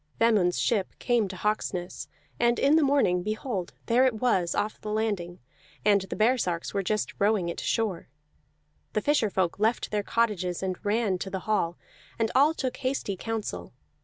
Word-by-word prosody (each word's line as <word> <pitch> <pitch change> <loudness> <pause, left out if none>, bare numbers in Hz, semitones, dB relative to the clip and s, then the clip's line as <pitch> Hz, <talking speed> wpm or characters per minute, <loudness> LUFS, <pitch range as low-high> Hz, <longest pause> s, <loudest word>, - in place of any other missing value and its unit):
Vemund's 210 -6 +3
ship 205 -5 0
came 240 -4 +1
to 190 - -7
Hawksness; 185 -3 -2 0.3
and 235 0 +3
in 280 +3 +4
the 320 - +5
morning, 270 -11 +3
behold, 215 -2 -3
there 240 +3 +4
it 250 - 0
was 200 -7 +1
off 215 +1 -2
the 215 - -5
landing, 205 -5 -2 0.5
and 205 -2 +5
the 190 - -6
baresarks 215 -7 +1
were 200 - +1
just 210 +2 -1
rowing 200 -4 +2
it 170 - -4
to - - -5
shore. 215 -7 -1 0.9
The 215 - +1
fisher 290 -6 +2
folk 190 -2 -1
left 220 +3 +1
their 210 -1 +1
cottages 200 -5 0
and 185 -1 -3
ran 205 -3 +1
to 190 - -4
the 190 -1 -4
hall, 180 -5 0 0.4
and 225 -1 0
all 295 +4 +4
took 260 -5 -3
hasty 255 -6 -2
counsel. 225 +2 -4
210 Hz, 175 wpm, -27 LUFS, 185-235 Hz, 0.9 s, the